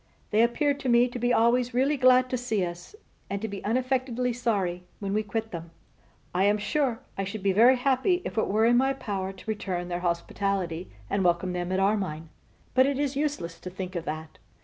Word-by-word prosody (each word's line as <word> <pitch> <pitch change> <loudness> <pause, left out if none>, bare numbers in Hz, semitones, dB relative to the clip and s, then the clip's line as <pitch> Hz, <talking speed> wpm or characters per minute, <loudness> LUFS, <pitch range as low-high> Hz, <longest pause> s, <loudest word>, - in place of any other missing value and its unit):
They 215 - +4
appear 265 +5 +2
to 275 -2 -4
me 240 +1 +5
to 245 0 -6
be 245 +1 +1
always 240 +1 +3
really 275 +4 +3
glad 255 -1 +5
to - - +1
see 220 -6 0
us, 175 - -8 0.3
and 200 - -2
to 220 - -3
be 200 -2 -7
unaffectedly 250 +1 0
sorry 200 -7 -1 0.2
when 200 -1 -3
we 215 - +2
quit 220 +1 -4
them. 170 -1 -6 0.6
I 185 +2 +2
am 205 +1 +4
sure 235 +3 0 0.2
I - - +1
should 200 +1 -5
be 195 - +3
very 235 +6 +6
happy 275 +8 +1
if - - -4
it 220 - +1
were 215 +3 +2
in 240 +1 +5
my 265 +2 +3
power 195 -7 -4
to 190 - -14
return 185 -5 -3
their 175 0 -2
hospitality, 175 0 -2 0.2
and 195 - 0
welcome 180 +1 +1
them 175 0 -3
at 190 - +1
Armine: 190 -6 0 0.4
but 260 +1 +5
it 280 -1 0
is 285 -1 -1
useless 280 - -2
to 180 - -7
think 185 0 -6
of 170 - -3
that. 155 +1 -6
215 Hz, 215 wpm, -27 LUFS, 185-250 Hz, 0.6 s, very